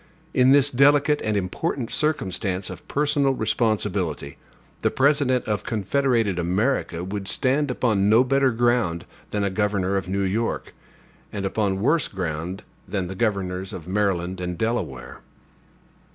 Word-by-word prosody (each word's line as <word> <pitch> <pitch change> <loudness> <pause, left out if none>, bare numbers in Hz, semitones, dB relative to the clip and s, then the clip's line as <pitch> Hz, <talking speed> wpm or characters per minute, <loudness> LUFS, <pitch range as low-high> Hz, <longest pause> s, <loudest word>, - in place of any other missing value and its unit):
In 130 +1 +5
this 140 0 +5
delicate 145 +3 +4
and 110 -1 0
important 115 - -2
circumstance 95 - -1
of 90 - -11
personal 145 -2 +1
responsibility, 100 - -1 0.4
the - - +1
President 135 -2 +2
of 105 -2 -2
Confederated 115 -2 0
America 90 0 0
would 95 +1 -5
stand 135 +7 +1
upon 110 -6 +1
no 115 +4 +6
better 135 +1 +2
ground 115 -8 +1 0.2
than 105 -1 -1
a 100 - 0
governor 100 -1 0
of 95 - -3
New 100 +1 0
York, 110 +5 -2 0.6
and 100 -2 -4
upon 95 -1 0
worse 150 +6 +2
ground 90 +1 -4 0.2
than 95 -3 -2
the 90 - -5
governors 95 -3 -2
of 85 -2 -8
Maryland 95 -2 -1
and 90 -1 -3
Delaware. 110 -6 -3
105 Hz, 140 wpm, -24 LUFS, 95-130 Hz, 0.6 s, no